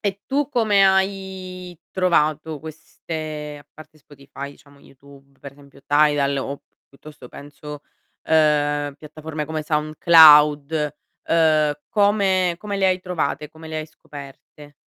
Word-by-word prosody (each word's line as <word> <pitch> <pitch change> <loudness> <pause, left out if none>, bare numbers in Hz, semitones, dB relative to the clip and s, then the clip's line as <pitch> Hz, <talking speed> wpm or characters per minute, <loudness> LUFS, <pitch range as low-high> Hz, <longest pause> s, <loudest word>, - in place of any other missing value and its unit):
E 200 -1 -3
tu 280 0 -1
come 215 -7 +3
hai 190 -2 -2
trovato 155 -4 0
queste 155 -1 -8
a - - -42
parte 155 0 -16
Spotify 140 -1 -11
diciamo 140 0 -20
YouTube 140 0 -20
per 140 -1 -11
esempio 140 -1 -19
Tidal 145 -1 +2
o 140 +1 -4
p - - -47 0.3
piuttosto 145 -2 -14
penso 145 +1 -11 0.4
uhm, 145 -2 +1
piattaforme 155 +1 -7
come 155 0 -4
SoundCloud, 150 -1 +5 0.3
uhm, 155 -2 +3 0.2
come 195 -4 +2
come 205 0 -5
le 195 -1 +2
hai 185 0 +1
trovate, 180 -4 -3
come 160 +1 -13
le 160 - -5
hai 155 - -6
scoperte? 145 0 -14
155 Hz, 130 wpm, -21 LUFS, 145-180 Hz, 0.4 s, SoundCloud